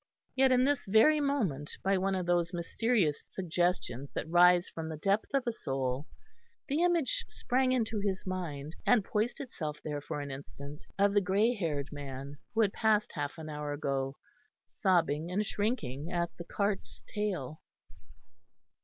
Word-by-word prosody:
Yet, 265 0 +5
in 250 0 +5
this 275 -4 +1
very 225 +10 +6
moment, 215 - -1
by 195 +1 +3
one 195 +1 +1
of 185 -1 -1
those 175 0 +1
mysterious 175 -2 +1
suggestions 175 -7 -1
that - - -3
rise 175 +1 +6
from 160 -1 -6
the 160 - -5
depth 200 +6 +1
of 275 -2 +1
a 240 - +1
soul, 135 - -2 0.6
the 295 +4 +1
image 350 - +2
sprang 255 +1 +1
into 225 -4 +1
his 200 -2 -2
mind, 160 -6 -4
and 235 -6 +4
poised 215 +3 -1
itself 155 - -5
there 150 -2 -3
for 145 +1 -4
an 145 -1 -5
instant, 140 +2 -8 0.2
of 200 0 +4
the 205 - +4
grey 205 +5 +3
haired 150 - -2
man 140 0 -7 0.2
who 225 - +4
had 205 -3 +2
passed 215 -2 +2
half 145 +1 -3
an 160 -1 -7
hour 150 -1 -4
ago, 135 -2 -2 0.5
sobbing 170 -4 +1
and 200 +4 0
shrinking 170 - -2
at 170 -1 -1
the 170 - -8
cart's 200 +2 -2
tail. 185 - -3
180 Hz, 160 wpm, -31 LUFS, 150-220 Hz, 0.6 s, very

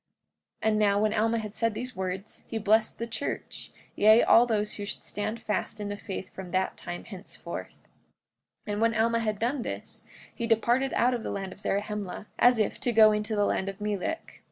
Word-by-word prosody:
45:17 - - +2
And 215 - +1
now, 200 -1 +3
when 215 0 +2
Alma 225 +1 +2
had 215 -2 -5
said 230 -1 0
these 250 +1 -5
words 190 +2 -5
he 225 - -3
blessed 220 +1 +2
the 230 - -3
church, 230 +4 -5 0.2
yea, 215 +2 +6
all 240 +2 +6
those 210 -2 0
who 205 - -5
should 200 - -5
stand 215 +2 -3
fast 215 0 -2
in 205 -1 -3
the 205 - -3
faith 195 -2 -7
from 190 -2 -7
that 185 +1 0
time 175 0 -6
henceforth. 195 -2 -9 0.8
45:18 210 - -3
And 205 - -2
when 230 0 +3
Alma 230 +1 +2
had 215 -2 -1
done 245 +5 0
this - - -6 0.3
he 235 - -3
departed 240 +4 +2
out 250 +1 +3
of 240 - -2
the - - -4
land 195 -1 -4
of - - -18
Zarahemla, 205 -1 -2
as 245 0 +6
if 215 -2 0
to 245 - 0
go 220 -1 +7
into 210 +1 -1
the 205 -1 +3
land 195 -1 0
of 195 +1 -8
Melek. 210 - -3
215 Hz, 210 wpm, -28 LUFS, 205-230 Hz, 0.8 s, go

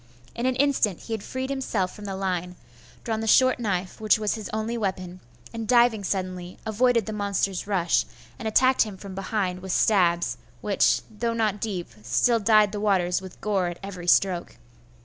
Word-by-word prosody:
In 240 +2 -1
an 260 - +1
instant 260 - +1
he 225 - -6
had 220 - -3
freed 260 +5 -4
himself 220 -9 -1
from 210 - -10
the 195 -1 -4
line; 180 -2 -2 0.5
drawn 220 -2 -2
the 225 - -3
short 255 +4 +5
knife 195 -4 -3
which 215 0 +4
was 210 -1 -1
his 215 -4 -6
only 220 +2 -2
weapon; 185 -4 -3 0.3
and 225 -1 -5
diving 235 -3 +4
suddenly, 185 -2 -3
avoided 230 +1 +2
the 215 - -5
monster's 200 -2 -1
rush, 180 -4 +1 0.3
and 230 - -4
attacked 255 +4 +4
him 210 -3 -1
from 195 0 -9
behind 190 -1 -2
with 190 0 -6
stabs, 175 -4 +2 0.2
which, - - +2
though 230 +2 -3
not 215 -3 0
deep, 190 -6 -3
still 120 - +2
dyed 215 -1 +4
the 210 - -4
waters 185 -3 +1
with 190 -1 -11
gore 195 -4 0
at 175 0 -5
every 185 -3 -7
stroke. 180 -1 +2
205 Hz, 185 wpm, -25 LUFS, 185-225 Hz, 0.5 s, short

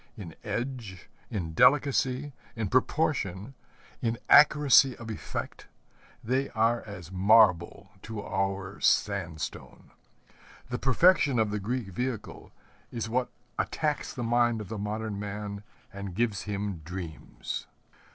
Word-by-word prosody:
In 90 -7 -8
edge, 115 -3 -5 0.2
in 85 -6 -4
delicacy, 130 - +3 0.2
in 110 -4 -2
proportion, 125 - 0 0.5
in 115 0 0
accuracy 145 -3 +6
of 115 -1 -7
effect, 105 - -6 0.6
they 130 +4 0
are 115 +2 +2
as 95 -4 -9
marble 95 -1 +4
to 110 -1 -6
our 95 0 -2
sandstone. 80 -1 -1 0.8
The 125 - -2
perfection 140 0 +4
of 110 -2 +2
the 105 - -2
Greek 115 +1 -3
vehicle 120 +2 -5 0.4
is 115 -2 -4
what 125 +2 0 0.3
attacks 150 -2 -1
the 125 - -5
mind 120 -1 +2
of 105 -3 -7
the 110 - -5
modern 105 0 -3
man 100 0 -5 0.3
and 100 -2 -6
gives 110 -2 0
him 100 -3 -3
dreams. 85 -7 -6
110 Hz, 120 wpm, -28 LUFS, 100-125 Hz, 0.8 s, accuracy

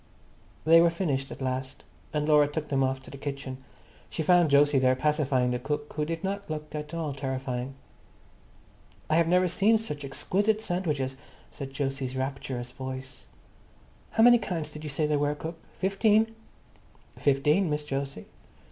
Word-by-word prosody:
They 165 +1 +8
were 170 - +5
finished 150 -6 -1
at - - -7
last, 130 0 -3 0.3
and 150 0 -1
Laura 150 -1 +6
took 150 +1 -4
them 135 -1 +1
off 130 0 -1
to - - -12
the 140 - -9
kitchen. 140 -2 -5 0.5
She 160 - -2
found 175 -2 +4
Jose 145 0 +5
there 130 0 +4
pacifying 135 -3 +1
the 125 - -1
cook, 150 +3 -3
who 150 0 -1
did 165 +2 -4
not 200 0 -3
look 150 -1 -5
at 150 +1 -5
all 160 -4 -2
terrifying. 130 -1 -3 1.4
"I 155 - +4
have 170 -1 +4
never 180 +1 +4
seen 210 +6 +4
such 150 -10 -6
exquisite 200 +10 0
sandwiches," 150 -10 -2 0.3
said 135 -2 -7
Jose's 135 -2 -2
rapturous 130 -2 -3
voice. 130 0 -7 0.8
"How 225 - +3
many 240 0 +8
kinds 165 -7 -3
did 150 0 -9
you 150 - -4
say 150 +2 0
there 150 -1 +1
were, 145 0 +1
cook? 160 +3 -6
Fifteen?" 215 +3 +2 0.9
"Fifteen, 150 +6 +3
Miss 150 0 -2
Jose." 135 -7 -4
150 Hz, 165 wpm, -28 LUFS, 135-165 Hz, 1.4 s, They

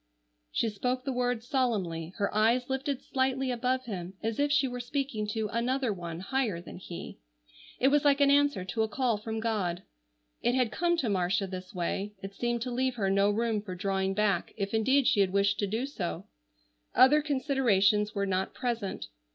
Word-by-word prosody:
She 230 - +1
spoke 250 +5 -2
the 270 - -1
words 245 -1 -1
solemnly, 190 - -1
her 200 -2 -1
eyes 235 +5 +2
lifted 275 0 -2
slightly 265 0 0
above 255 +1 0
him 190 -4 -6
as 225 +2 -2
if 290 0 +2
she 285 -2 +3
were 245 -1 -5
speaking 245 -4 -2
to 215 +1 -1
Another 245 +1 0
One 170 -2 -6
higher 225 -4 -1
than 170 - -10
he. 175 -1 -8 0.6
It 265 - +5
was 290 0 +3
like 285 -1 +4
an 280 -1 +5
answer 285 -9 +3
to 220 +4 -2
a 220 - +2
call 235 +1 0
from 220 +1 -4
God. 205 -6 -1 0.6
It 240 +1 +2
had 250 -4 +2
come 345 +4 +1
to 260 -8 0
Marcia 195 +1 +1
this 185 0 -8
way. 195 +4 -2
It 195 0 -6
seemed 240 +2 -1
to 250 - -4
leave 255 +1 0
her 195 -4 0
no 200 +1 +4
room 220 0 0
for 190 -3 -7
drawing 190 0 -1
back, 205 -4 0
if 200 0 -3
indeed 260 +5 +3
she 210 - +3
had 195 -2 +4
wished 200 +1 +2
to 205 - +1
do 220 +6 -1
so. 190 - -4 0.7
Other 285 +4 +7
considerations 240 -8 +2
were 200 0 0
not 190 0 -1
present. 235 -5 -3
225 Hz, 190 wpm, -29 LUFS, 195-260 Hz, 0.7 s, Other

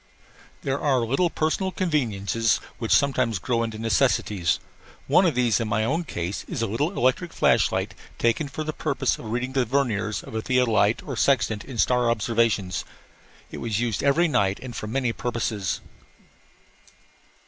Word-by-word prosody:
There 135 +1 -1
are 135 -4 +2
little 140 +9 +1
personal 165 +5 -1
conveniences 115 - 0 0.2
which 115 -2 -3
sometimes 130 -6 +3
grow 115 +5 -1
into 115 -1 -3
necessities. 110 -5 +1 0.5
One 185 +1 +4
of 160 - 0
these 120 -3 +2
in 115 - -1
my 110 0 +1
own 160 +8 0
case 90 - -4
was - - -2
a - - +2
little 145 - -1
electric 130 +8 +1
flash - - +3
light - - -2 0.2
taken 120 +6 +1
for 145 +3 -5
the 155 0 -3
purpose 140 -4 -1
of - - -9
reading 120 +4 -3
the 130 -1 +2
verniers 110 -5 -1
of - - -11
a 110 - -1
theodolite 115 -4 +2
or 135 - -5
sextant 115 -4 +1
in 130 -3 -9
star 125 +1 +3
observations. 115 -4 +1 0.7
It - - -6
was 110 -3 -2
used 120 -3 -1
every 145 +5 +3
night 100 -9 +1
and 130 -2 -8
for 105 - -5
many 125 +1 -1
purposes. 115 -5 -2
120 Hz, 165 wpm, -25 LUFS, 110-140 Hz, 0.7 s, One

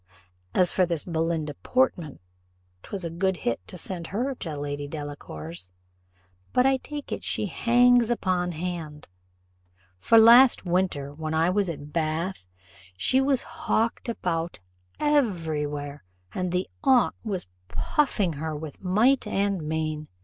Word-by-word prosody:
As 180 -1 +4
for 185 - +2
this 170 -3 -1
Belinda 165 -3 -1
Portman, 180 - 0 0.6
'twas 190 - -5
a 165 - -3
good 190 +2 0
hit 120 - +1
to - - -8
send 170 -1 -5
her 250 +7 -1
to 160 - -6
Lady 145 0 -4
Delacour's; 95 - -6 0.8
but, 250 - +4
I 270 0 +4
take 290 +2 -8
it - - -4
she - - 0
hangs 240 +4 +4
upon 180 -6 0
hand; 160 - -5 0.9
for 230 - +5
last 235 +1 +8
winter, 170 -6 0
when 155 +1 -4
I 165 +3 +3
was 200 -1 +1
at 150 -2 -7
Bath, 165 - -2 0.5
she 260 - +3
was 270 -2 +1
hawked 240 -7 -1
about 175 -6 -2 0.4
every 180 - +1
where, 145 -2 -6 0.3
and 180 -1 -2
the 180 +1 0 0.2
aunt 260 -3 +4
was 200 -5 -3 0.2
puffing 180 - 0
her 155 +1 -4
with 150 +1 -8
might 220 +9 +3
and 200 -2 0
main. 155 -1 -2
175 Hz, 140 wpm, -26 LUFS, 155-225 Hz, 0.9 s, last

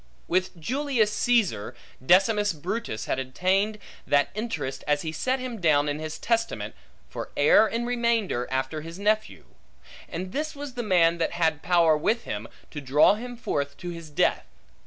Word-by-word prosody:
With 185 0 0
Julius 250 - 0
Caesar, 215 - +1 0.3
Decimus 200 +6 +4
Brutus 175 - -4
had - - -1
obtained 185 +11 0 0.3
that 145 0 +3
interest 210 - -4
as 145 0 +1
he 160 - -3
set 255 - -1
him 245 -5 -6
down 150 -3 +3
in 145 +1 -2
his 155 0 -5
testament, 230 - -1 0.3
for - - -6
heir 150 +9 +6
in 230 +2 -2
remainder, 235 - 0
after 130 +4 -2
his 165 +3 -9
nephew. 215 +2 -1 0.6
And 185 +2 -5
this 310 +4 -3
was 285 -2 -7
the 245 - -3
man 170 -6 +3
that - - 0
had 160 -3 +1
power 170 -3 +4
with 220 +10 0
him, 105 +2 -5 0.2
to 145 - -6
draw 140 +7 +5
him 245 +3 -6
forth 140 -10 -3
to 175 -1 -6
his 170 -2 -9
death. 145 - +1
180 Hz, 165 wpm, -26 LUFS, 150-230 Hz, 0.6 s, heir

